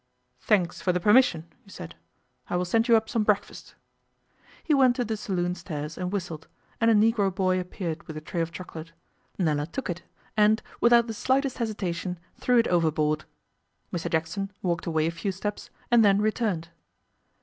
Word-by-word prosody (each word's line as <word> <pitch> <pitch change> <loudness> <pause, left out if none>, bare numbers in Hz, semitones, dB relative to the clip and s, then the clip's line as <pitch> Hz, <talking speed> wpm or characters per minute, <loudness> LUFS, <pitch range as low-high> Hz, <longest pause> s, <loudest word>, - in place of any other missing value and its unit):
'Thanks 180 -5 +1
for 180 - +2
the 180 - 0
permission,' 210 -5 +4 0.2
he 200 - -20
said. 85 - -9 0.6
'I - - -1
will 180 - 0
send 225 +6 +1
you 230 -2 +7
up 220 0 -2
some 225 - 0
breakfast.' 210 -1 -1 0.9
He 315 - +1
went 260 -3 +5
to 250 -2 -1
the 220 0 -2
saloon 180 -4 -2
stairs 155 -3 -6
and 180 0 -3
whistled, 170 -6 -4 0.3
and 230 - +5
a 225 - +5
Negro 210 -1 +3
boy 185 0 +1
appeared 180 -2 -5
with 155 - -7
a - - -6
tray 170 +2 -3
of 165 0 -2
chocolate. 165 -1 -9 0.4
Nella 150 -5 0
took 210 +3 -4
it, 175 - -6 0.3
and, 215 +1 +4 0.2
without 235 0 +5
the 225 - -5
slightest 260 +4 0
hesitation, 185 -5 -3 0.2
threw 250 -1 +3
it 230 - +4
overboard. 155 -3 +1 0.7
Mr 175 - -2
Jackson 170 +5 -2
walked 170 -2 -1
away 160 -2 +1
a 165 - 0
few 170 +4 -3
steps 205 +2 -5 0.2
and 235 -1 +6
then 200 -1 +5
returned. 210 -6 -1
185 Hz, 180 wpm, -26 LUFS, 170-220 Hz, 0.9 s, you